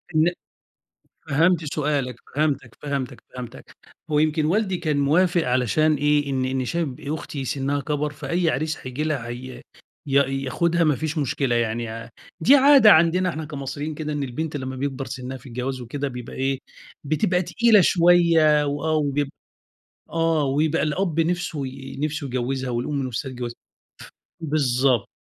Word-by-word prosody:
إن 160 Hz, +3 st, +4 dB, 1.0 s
فهمت 160 Hz, +1 st, +2 dB
سؤالك، 140 Hz, -5 st, -1 dB, 0.2 s
فهمتك، 140 Hz, -5 st, -1 dB
فهمتك، 140 Hz, -3 st, -4 dB
فهمتك، 125 Hz, -2 st, -9 dB, 0.3 s
هو 150 Hz, -, +3 dB
يمكن 155 Hz, 0 st, +2 dB
والدي 190 Hz, +2 st, +1 dB
كان 155 Hz, -4 st, -1 dB
موافق 170 Hz, +4 st, +3 dB
علشان 130 Hz, +5 st, +2 dB
إيه، 145 Hz, -1 st, +1 dB
إن 130 Hz, -1 st, 0 dB
إن 130 Hz, 0 st, -1 dB
شايف 170 Hz, +3 st, -1 dB
أختي 145 Hz, -2 st, -5 dB
سنّها 140 Hz, +2 st, -1 dB
كبَر 150 Hz, +1 st, -2 dB
فأي 170 Hz, +3 st, -1 dB
عريس 155 Hz, +1 st, -1 dB
هييجي 130 Hz, +4 st, -5 dB
لها 140 Hz, -7 st, -2 dB
هي 125 Hz, +1 st, -7 dB, 0.5 s
ي 135 Hz, -, -4 dB, 0.3 s
ياخدها 170 Hz, +5 st, +1 dB
ما 150 Hz, -3 st, +3 dB
فيش 155 Hz, +3 st, -3 dB
مشكلة 135 Hz, -3 st, 0 dB
يعني 115 Hz, 0 st, -1 dB
ع 115 Hz, +1 st, -7 dB, 0.3 s
دي 265 Hz, -, +7 dB
عادة 275 Hz, -5 st, +7 dB
عندنا 175 Hz, +2 st, +4 dB
إحنا 160 Hz, -1 st, -4 dB
كمصريين 145 Hz, +1 st, -5 dB
كده 150 Hz, 0 st, -4 dB
إن 145 Hz, -1 st, -2 dB
البنت 145 Hz, +4 st, -4 dB
لمّا 130 Hz, -1 st, -5 dB
بيكبَر 135 Hz, 0 st, -3 dB
سنّها 130 Hz, 0 st, -6 dB
في 130 Hz, +2 st, -14 dB
الجواز 125 Hz, +2 st, -4 dB
وكده، 140 Hz, +4 st, -4 dB
بيبقى 125 Hz, -2 st, -7 dB
إيه، 135 Hz, 0 st, -1 dB, 0.4 s
بتبقى 180 Hz, +5 st, +1 dB
تقيلة 220 Hz, +2 st, +4 dB
شويّة 165 Hz, -4 st, +4 dB
وآه 145 Hz, +2 st, -1 dB
وبيبق 145 Hz, -2 st, 0 dB, 0.8 s
آه 165 Hz, -2 st, +1 dB
ويبقى 150 Hz, +4 st, +1 dB
الأب 165 Hz, +1 st, 0 dB
نِفسُه 165 Hz, -4 st, -1 dB
ي 135 Hz, +1 st, -8 dB
نِفسُه 150 Hz, -1 st, -2 dB
يجوّزها، 130 Hz, +1 st, -2 dB
والأم 130 Hz, +4 st, -2 dB
نِفسَها 130 Hz, +3 st, -4 dB
تجوزها، 120 Hz, -1 st, -6 dB, 0.9 s
ف -, -, -10 dB
بالضبط، 130 Hz, -5 st, +1 dB
145 Hz, 150 wpm, -23 LUFS, 130-160 Hz, 1.0 s, دي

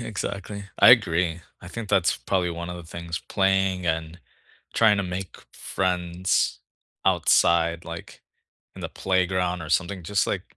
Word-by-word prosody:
exactly. 100 Hz, -2 st, -5 dB
I -, -, +9 dB
agree, 85 Hz, -7 st, +3 dB, 0.2 s
I 85 Hz, -, -9 dB
think 115 Hz, +1 st, -6 dB
that's, 95 Hz, -, +2 dB
probably, 90 Hz, -2 st, -1 dB
one 85 Hz, +1 st, -5 dB
of 90 Hz, -, -6 dB
the 85 Hz, -, -8 dB
things 85 Hz, -1 st, -6 dB
playing, 95 Hz, -1 st, 0 dB
and 80 Hz, +1 st, -2 dB, 0.6 s
trying 110 Hz, -2 st, +5 dB
to 100 Hz, -, 0 dB
make 90 Hz, 0 st, -5 dB, 0.2 s
friends 90 Hz, -1 st, -1 dB, 0.4 s
outside, 85 Hz, 0 st, +3 dB
like, 85 Hz, 0 st, -9 dB, 0.5 s
in -, -, -10 dB
the -, -, -3 dB
playground, 90 Hz, -2 st, 0 dB
or 80 Hz, -, -7 dB
something, 95 Hz, +2 st, 0 dB
just, 95 Hz, +3 st, 0 dB
like -, -, -4 dB
90 Hz, 150 wpm, -25 LUFS, 85-95 Hz, 0.6 s, I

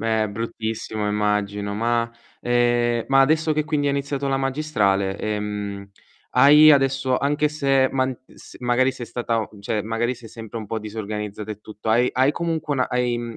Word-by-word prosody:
Eh, 110 Hz, -1 st, +1 dB
bruttissimo 110 Hz, -1 st, -4 dB
immagino. 105 Hz, -1 st, -1 dB
Ma, 115 Hz, +2 st, 0 dB, 0.3 s
ehm, 120 Hz, -1 st, +1 dB
ma 135 Hz, 0 st, +5 dB
adesso 155 Hz, +3 st, +3 dB
che 155 Hz, 0 st, 0 dB
quindi 150 Hz, -1 st, 0 dB
hai -, -, +1 dB
iniziato 140 Hz, 0 st, -2 dB
la 135 Hz, -, +1 dB
magistrale, 120 Hz, -9 st, 0 dB
ehm, 105 Hz, -1 st, -4 dB, 0.4 s
hai 150 Hz, +4 st, +8 dB
adesso 135 Hz, -2 st, +3 dB
anche 145 Hz, +2 st, +1 dB
se 135 Hz, -3 st, +2 dB
man 130 Hz, -1 st, 0 dB, 0.2 s
s -, -, -14 dB
magari 125 Hz, +2 st, +2 dB
sei 120 Hz, -2 st, -8 dB
stata 115 Hz, -2 st, -1 dB
o 110 Hz, -, -5 dB
cioè, 105 Hz, +1 st, -2 dB
magari 115 Hz, +3 st, -1 dB
sei 115 Hz, -2 st, -13 dB
sempre 115 Hz, 0 st, -8 dB
un 110 Hz, -, -7 dB
po' 110 Hz, +2 st, -3 dB
disorganizzata 105 Hz, -1 st, -5 dB
e 105 Hz, -1 st, -7 dB
tutto, 105 Hz, +1 st, -9 dB
hai 120 Hz, +3 st, +4 dB
hai 130 Hz, +2 st, +3 dB
comunque 160 Hz, -3 st, -2 dB
una 130 Hz, -2 st, 0 dB
hai 125 Hz, -1 st, 0 dB
mhmm, 120 Hz, -1 st, -6 dB
120 Hz, 175 wpm, -22 LUFS, 105-135 Hz, 0.4 s, hai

